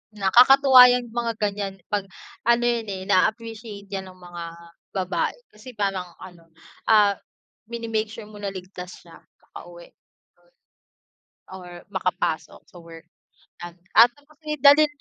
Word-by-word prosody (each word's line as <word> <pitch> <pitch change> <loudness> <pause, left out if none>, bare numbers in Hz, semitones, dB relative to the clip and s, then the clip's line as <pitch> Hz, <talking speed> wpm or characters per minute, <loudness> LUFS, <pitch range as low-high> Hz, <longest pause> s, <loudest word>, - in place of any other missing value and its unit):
Nakakatuwa 250 +6 +7
yung 245 -2 -3
mga 235 0 -2
ganiyan 205 -2 -3 0.2
'pag 200 -1 -1 0.4
ano 235 0 +3
yun 235 -2 0
eh, 190 -2 -5
naa-appreciate 215 0 -1
'yan 190 -1 -5
ng 185 - -14
mga 175 -1 -9 0.5
babae 185 -1 -1 0.2
kasi 220 +4 -13
parang 195 -3 -2 0.2
ano, 175 -3 -14 0.4
ah, 210 -2 +5 0.6
mini-make 225 -2 -3
sure 225 +1 -10
mo 210 -1 -13
na 205 - -4
ligtas 185 -1 -10
siya - - -16
nakauwi - - -15 1.6
or 180 -2 -11
makapasok 180 -4 -3
sa 175 - -17
work, 165 -1 -14 0.5
yan, 175 0 -8 0.3
ah, 230 - +10
ano 285 +4 -26
kasi, 305 0 -6
dalhin 290 +2 +7
210 Hz, 130 wpm, -23 LUFS, 185-235 Hz, 1.6 s, ah